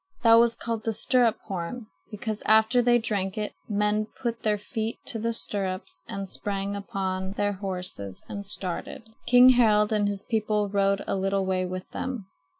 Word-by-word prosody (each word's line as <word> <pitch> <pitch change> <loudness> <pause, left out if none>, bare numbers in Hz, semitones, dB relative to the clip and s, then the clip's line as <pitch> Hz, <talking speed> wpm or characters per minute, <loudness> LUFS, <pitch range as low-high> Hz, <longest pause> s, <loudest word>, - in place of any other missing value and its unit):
That 230 -1 +7
was 235 0 +3
called 230 -2 -3
the 225 - -1
stirrup 235 +1 +2
horn, 195 +5 -5 0.2
because 215 0 -4
after 220 +3 +5
they 240 0 +4
drank 205 -3 -2
it 210 -1 -2
the 210 - -4
men 210 +1 +1
put 235 -2 -3
their 210 -1 +1
feet 220 +2 -4
to 225 - +1
the 230 +2 0
stirrups 195 -4 -1
and 195 0 -5
sprang 200 +1 -3
upon 190 -2 -3
their 205 0 0
horses 180 - -6
and 200 -1 -6
started. 195 +2 -5 0.2
King 245 +1 +8
Harald 220 -4 +4
and 205 -1 +2
his 200 -1 -1
people 210 -2 0
rode 200 0 +1
a - - -1
little 195 0 0
way 185 -1 0
with 185 0 -6
them. 255 -7 -4
210 Hz, 175 wpm, -26 LUFS, 195-225 Hz, 0.2 s, King